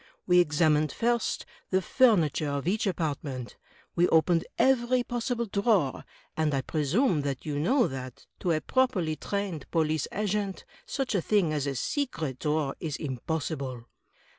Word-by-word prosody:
We 180 -1 +5
examined 155 -2 +3
first, 235 - 0 0.2
the 190 - +3
furniture 185 - +3
of 140 +2 -3
each 210 +3 +1
apartment, 145 -8 -3 0.4
we 175 +1 +4
opened 165 +1 +3
every 250 -1 +3
possible 240 0 -2
drawer; 200 - +1 0.3
and 155 -2 +1
I 135 - +1
presume 155 - +1
that 140 -2 -3
you 145 -2 -2
know 240 - +3
that, 130 -3 -7
to 175 - 0
a 155 -1 +1
properly 205 -12 +1
trained 195 -6 -4
police 155 -2 +1
agent, 205 -1 -2 0.2
such 270 - -2
a 195 - +2
thing 185 -5 +2
as 145 -2 -1
a 140 - -2
secret 160 - -2
drawer 150 -2 0
is 155 -4 -3
impossible. 135 -2 -3
165 Hz, 145 wpm, -28 LUFS, 145-210 Hz, 0.4 s, We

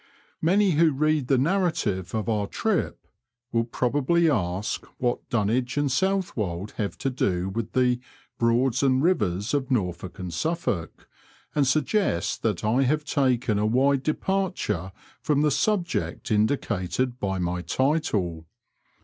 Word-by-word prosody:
Many 195 +4 +3
who 160 -1 +4
read 155 -1 +1
the 135 - +3
narrative 135 - 0
of 110 0 -2
our 105 -3 0
trip 215 - -1 0.5
will 115 -1 +1
probably 145 +8 +1
ask 95 -4 -1
what 120 -1 -2
Dunwich 120 +4 0
and 145 -2 +1
Southwold 125 - -1
have 100 -5 -2
to 135 - -2
tdo 95 -6 -1
with 115 0 -4
the 125 -1 +2 0.4
Broads 120 +2 +2
and 130 -2 +3
Elvers 105 - +1
of 140 -2 0
Norfolk 95 -7 -2
and 90 -2 -6
Suffolk," 155 - -2 0.5
and 145 -3 +2
suggest 150 - +1
that 105 -6 -1
I 115 +5 +3
have 150 +3 +1
taken 125 -7 +1
a 105 - +1
wide 135 +4 +3
departure 155 - -1 0.3
from 150 -1 +1
the 150 - +3
subject 170 - -1
indicated 110 +1 0
by 95 -1 -1
my 90 0 -2
title. 105 - 0
125 Hz, 135 wpm, -25 LUFS, 100-150 Hz, 0.5 s, who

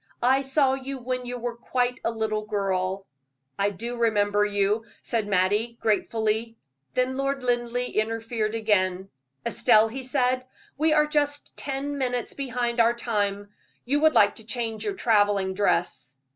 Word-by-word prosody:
I 265 +2 +4
saw 270 0 +2
you 270 0 -4
when 255 0 -4
you 245 0 -4
were 240 0 -4
quite 245 +1 -1
a - - +1
little 215 -2 -2
child." 195 -2 -1 0.5
"I 200 +1 +3
do 235 +4 -5
remember 205 -3 +2
you," 205 +2 +1 0.2
said 225 -3 -1
Mattie, 205 +5 +1
gratefully. 220 +1 0 0.4
Then 255 +1 +1
Lord 275 -1 -1
Linleigh 245 0 -1
interfered 225 0 -2
again. 195 -4 0 0.3
"Estelle," 220 +1 +4
he 265 +4 -5
said, 255 0 +1 0.3
"we 310 +3 +2
are 300 -1 +5
just 290 -1 -1
ten 280 +1 -4
minutes 250 -2 -2
behind 245 -3 -2
our 230 +1 +4
time. 205 -4 -2 0.4
You 285 +4 +1
would 315 0 +4
like 205 -1 +6
to - - -15
change 225 -1 -3
your 410 -2 -2
traveling 205 - +2
dress." 170 -9 0
230 Hz, 150 wpm, -26 LUFS, 205-255 Hz, 0.5 s, like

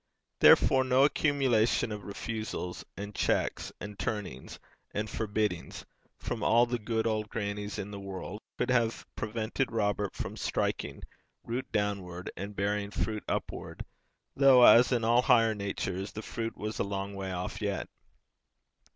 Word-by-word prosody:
Therefore 130 0 +6
no 130 +1 +4
accumulation 135 -7 +2
of 105 -1 -6
refusals, 110 -3 -4
and 100 +1 -6
checks, - - 0
and 105 -1 -8
turnings, 100 - -4 0.4
and 105 +1 -1
forbiddings, 105 -5 -2 0.3
from 115 - -4
all 120 +3 +5
the 120 0 -2
good 110 +1 -1
old 110 -1 0
grannies 105 -1 -3
in 105 0 -5
the 100 - -6
world, 100 +1 -6 0.2
could 125 - 0
have 115 -2 +1
prevented 110 +4 -2
Robert 105 -2 0
from - - -4
striking - - -2 0.4
root 125 +3 -4
downward, 95 -4 -2
and 100 +3 -6
bearing 100 +1 -1
fruit 105 +1 -2
upward, - - -4 0.5
though, 135 -2 +7
as 120 +1 +8
in 120 -2 +1
all 120 +2 +4
higher 115 -4 +4
natures, 100 -1 -3
the 110 - -6
fruit 115 +1 -4
was 105 +1 -4
a - - +2
long 100 0 -3
way 95 -1 -4
off 90 0 -4
yet. - - -2
105 Hz, 145 wpm, -30 LUFS, 100-115 Hz, 0.5 s, as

